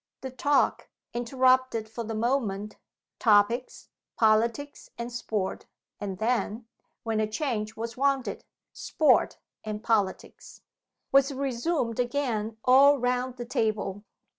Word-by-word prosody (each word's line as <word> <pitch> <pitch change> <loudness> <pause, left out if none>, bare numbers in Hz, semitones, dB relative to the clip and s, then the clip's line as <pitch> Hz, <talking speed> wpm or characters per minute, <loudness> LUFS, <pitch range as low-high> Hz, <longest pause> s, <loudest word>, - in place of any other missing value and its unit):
The 265 - -6
talk, 285 +2 +1 0.2
interrupted 255 -1 +2
for 225 +2 -6
the 225 0 -5
moment 215 -4 -1 0.4
(topics, 225 +3 +2 0.3
Politics 230 +6 +1
and 235 +1 -5
Sport 220 -5 -3 0.3
and 195 -2 -5
then, 225 0 -1 0.4
when 225 -1 -1
a 215 - +1
change 220 -3 -3
was 230 +1 -5
wanted, 275 -1 0 0.3
Sport 310 - +2 0.3
and 215 0 -5
Politics), 205 -5 -2 0.5
was 275 +1 +4
resumed 265 -2 -2
again 240 -4 -1
all 275 +3 +7
round 250 0 -1
the 240 - -5
table. 210 -4 -2
235 Hz, 115 wpm, -27 LUFS, 215-260 Hz, 0.5 s, all